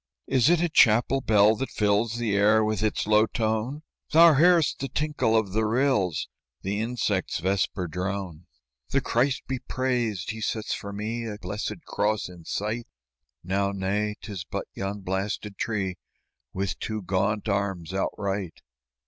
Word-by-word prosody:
"Is 130 +1 +3
it 175 -1 +4
a - - +3
chapel 125 -2 +4
bell 105 -1 +5
that 135 - -3
fills 105 +2 +1
The 115 -4 -1
air 105 +2 +4
with 110 -2 -1
its 110 -1 0
low 105 +1 +4
tone?" 115 +7 -2 0.3
"Thou 165 +1 +8
hear'st 170 +2 +4
the 135 - -2
tinkle 150 -6 +1
of 105 -4 0
the 110 +3 +1
rills, 110 - +1 0.4
The 100 +2 -1
insect's 110 -5 -1
vesper 95 +1 0
drone." 90 0 -4 0.4
"The 135 - +2
Christ 125 +1 0
be 130 -1 -3
praised! 120 -9 -1
He 110 0 -7
sets 110 0 -2
for 100 - -5
me 110 +3 -4
A 105 -2 -5
blessed 105 - -5
cross 105 -3 0
in 85 -2 -13
sight!" 110 +3 -3 0.6
"Now, 100 +2 0
nay, 100 +2 -1
'tis 100 -5 -6
but - - -5
yon 100 +1 -4
blasted 100 +2 -3
tree 95 -5 -2 0.5
With 95 0 -3
two 110 -2 -4
gaunt 100 +4 0
arms 95 -4 -1
outright!" 95 -1 -2
105 Hz, 155 wpm, -26 LUFS, 100-115 Hz, 0.6 s, Thou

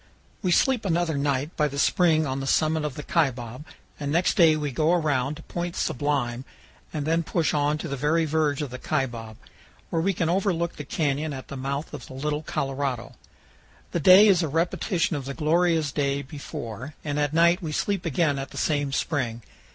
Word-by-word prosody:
We 185 - 0
sleep 255 +5 +3
another 170 -4 0
night 140 +2 -1
by 150 - +2
the 140 -1 -6
spring 160 0 +3
on 135 -1 -2
the 135 - -4
summit 155 +2 +2
of 145 -3 -4
the 150 - -6
Kaibab, 130 -6 -1 0.4
and 145 -1 -3
next 170 +4 +2
day 165 -3 +5
we 150 -2 -2
go 155 +6 +2
around 145 -4 +1
to 160 - -12
Point 175 0 -4
Sublime 130 -3 -1 0.5
and 150 -2 -3
then 165 +2 +2
push 165 0 0
on 150 0 +1
to 160 - -5
the 140 - -3
very 150 +4 +1
verge 150 -2 0
of 140 - -6
the 125 - -7
Kaibab, 120 -8 -3 0.5
where 165 - +1
we 195 +3 +1
can 165 - -1
overlook 175 -1 0
the 145 - -6
canyon 145 +1 -1
at 130 -1 -8
the - - -6
mouth 140 +3 -4
of - - -8
the 130 - -10
Little 150 +2 -2
Colorado. 135 -4 -3 0.8
The 170 - 0
day 185 +6 +8
is 185 -4 +5
a 165 - 0
repetition 165 +3 0
of 140 -3 -4
the 140 0 -5
glorious 165 -1 +2
day 140 -1 -1
before, 140 -2 -7
and 145 0 -1
at 145 -1 +1
night 170 +3 +4
we 160 -3 -4
sleep 195 +4 -1
again 155 -3 +1
at 135 - -5
the - - -11
same 145 -3 0
spring. 120 -5 -2
150 Hz, 200 wpm, -25 LUFS, 140-165 Hz, 0.8 s, day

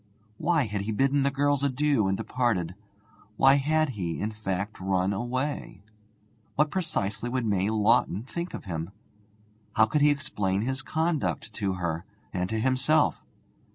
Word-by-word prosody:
Why 165 -2 +2
had 105 -3 -3
he 105 +3 -3
bidden 135 +5 +2
the 140 - +3
girls 145 0 +1
adieu 140 -5 +2
and 95 0 +1
departed? 110 -9 0 0.6
Why 135 +1 +6
had 155 +2 +2
he, 90 -9 -3
in 105 +2 -2
fact, 105 -1 -4
run 95 +1 +1
away? 120 -1 -3 0.7
What 150 0 +2
precisely 135 - -1
would 125 -1 -1
May 100 -2 +1
Lawton 110 -2 +2
think 170 +7 -5
of - - -7
him? 85 -2 -4 0.9
How 110 - +6
could 130 +7 0
he 150 - +6
explain 105 -9 0
his 130 +3 -2
conduct 155 -6 -1
to 100 -4 -1
her 85 -2 -2 0.3
and 90 -1 -1
to 110 - -1
himself? 130 +6 +2
115 Hz, 155 wpm, -27 LUFS, 100-140 Hz, 0.9 s, Why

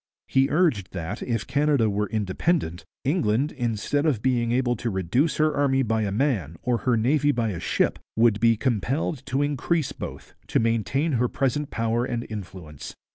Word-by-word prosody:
He 135 +1 +3
urged 150 - +1
that, 90 +2 -5
if 115 -3 -2
Canada 145 -5 +2
were 105 0 -1
independent, 105 - -1 0.2
'England, 140 -2 +1
instead 120 +3 -1
of 125 -9 0
being 120 -2 +1
able 120 0 +1
to 120 - -2
reduce 100 - 0
her 155 0 +2
army 135 -2 +2
by 110 -1 0
a 100 -2 -1
man 100 - 0
or 120 -2 +1
her 125 -2 +1
navy 145 +6 +3
by 115 -4 0
a 90 -5 -4
ship, - - 0 0.2
would 115 -2 +4
be 115 0 +4
compelled 130 - -1
to 135 +2 +1
increase 145 +2 0
both, - - -8
to - - +1
maintain 115 +7 +1
her 125 -2 +2
present 135 +3 -1
power 115 +1 0
and 120 -1 -3
influence.' 95 -8 -8
120 Hz, 175 wpm, -25 LUFS, 105-140 Hz, 0.2 s, would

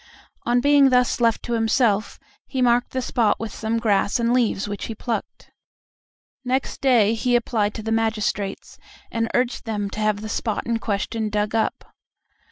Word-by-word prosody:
On 245 +1 +3
being 285 0 +5
thus 250 -1 +2
left 230 -2 +2
to 240 - -3
himself, 225 -2 +1 0.3
he 265 - -4
marked 245 -1 +3
the 260 -1 -3
spot 235 -4 +1
with 220 -2 -5
some 225 +1 -2
grass 210 0 +1
and 235 +1 +1
leaves 230 -5 +1
which 205 -1 -5
he 225 - -6
plucked. 235 +1 -5 0.9
Next 260 +1 -2
day 235 -6 +4
he 245 +2 +1
applied 220 -3 0
to 220 - -6
the 225 - -3
magistrates, 215 -3 -2 0.3
and 230 0 -1
urged 250 0 0
them 205 -3 -3
to - - -6
have 215 -1 0
the 215 - -5
spot 220 0 -2
in 235 -1 -1
question 215 +1 -2
dug 210 0 -1
up. 225 - -2
225 Hz, 175 wpm, -23 LUFS, 215-245 Hz, 0.9 s, being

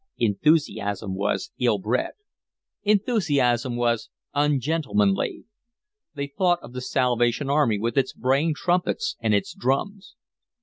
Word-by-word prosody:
Enthusiasm 110 - +1
was 100 +2 -2
ill 120 -4 +2
bred. 110 +6 -1 0.7
Enthusiasm 145 - +1
was 120 -1 0 0.2
ungentlemanly. 145 -8 +1 0.7
They 140 0 -2
thought 175 +5 +1
of 120 - -11
the 125 - -5
Salvation 125 +1 +1
Army 140 -8 +3
with 115 +3 -2
its 130 - 0
braying 140 +5 +1
trumpets 175 -11 0
and 110 -3 +2
its 100 - -1
drums. 180 +9 -2
130 Hz, 115 wpm, -24 LUFS, 115-150 Hz, 0.7 s, Army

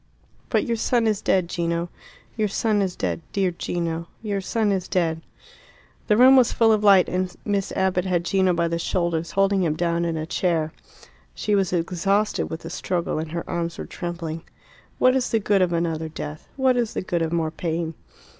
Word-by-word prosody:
"But - - +1
your 230 -1 -1
son 235 +1 +1
is 215 -3 +1
dead, 185 -2 +2
Gino. 170 0 -2 0.5
Your 215 -2 +1
son 210 +1 +1
is 185 -2 -1
dead, - - -2
dear 190 -2 +1
Gino. 170 -1 -3 0.2
Your 200 -2 -2
son 215 +2 0
is 190 -2 -1
dead." 165 -3 0 0.9
The 210 - +4
room 260 +2 +8
was 255 -3 +5
full 225 -1 +4
of 215 -1 +2
light, 195 -3 +6
and 185 0 -1
Miss 200 -2 -1
Abbott 185 -1 +1
had 175 -2 0
Gino 190 0 +2
by 170 -1 +1
the 170 0 -2
shoulders, 170 -1 -1
holding 195 0 +3
him 160 -4 +1
down 170 0 0
in 165 -1 -1
a 155 - -3
chair. 165 -2 0 0.6
She 210 - -1
was 195 -2 +2
exhausted 185 +4 0
with 160 - -5
the 165 - -8
struggle, 175 -3 -2
and 155 0 -5
her 170 0 -4
arms 170 -1 -3
were - - -5
trembling. 170 -2 -5 0.6
"What 255 0 +4
is 260 -1 +1
the 225 - +2
good 200 -2 +2
of 180 -1 +2
another 165 -2 -1
death? 155 -1 -7
What 260 -2 +2
is 235 -3 -1
the - - -2
good 175 -2 -1
of 165 -1 -1
more 165 -2 0
pain?" 165 0 -3
180 Hz, 200 wpm, -23 LUFS, 170-200 Hz, 0.9 s, room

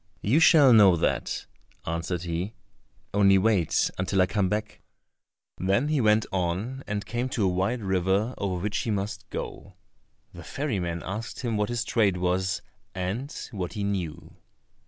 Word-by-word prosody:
"You 125 +10 +3
shall 150 -6 +7
know 100 -5 +7
that," 80 - -1 0.4
answered 85 +1 -3
he; 85 +5 -3 0.6
"only 100 -1 +5
wait 95 -4 +2
until 95 +1 0
I - - +3
come 95 0 0
back." 105 0 -3 0.8
Then 100 +10 +1
he 150 -3 +2
went 110 -1 +3
on 95 +9 -2
and 105 -2 -3
came 120 +4 -2
to 115 - -1
a - - +3
wide 95 +6 0
river 95 +5 +1
over 95 -3 -2
which 105 0 -1
he - - -3
must 100 0 -3
go. 95 - -7 0.6
The 85 - -10
ferryman 90 - -3
asked 110 +5 -5
him 120 -3 -1
what 105 +1 0
his 120 0 -1
trade 105 -6 +2
was, 90 +1 0 0.3
and 100 +10 -3 0.2
what 95 -5 -4
he 105 -3 -3
knew. 95 -6 -4
100 Hz, 155 wpm, -26 LUFS, 90-110 Hz, 0.8 s, shall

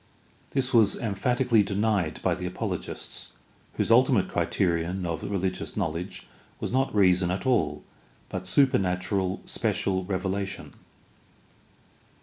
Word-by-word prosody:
This 130 -1 -1
was 110 -4 +5
emphatically 115 +2 +2
denied 100 -5 0
by - - +2
the 90 - -4
apologists, 90 - -5 0.4
whose - - 0
ultimate 125 -3 +5
criterion 90 +1 0
of 85 -1 -3
religious 95 -1 -3
knowledge 90 0 -3 0.3
was - - -3
not 130 -2 +1
reason 90 -3 +4
at 95 +1 -2
all, 80 - +1 0.4
but 95 -1 -5
supernatural, 95 -5 +2
special 95 -1 0
revelation. 95 +1 -3
95 Hz, 110 wpm, -27 LUFS, 90-110 Hz, 0.4 s, was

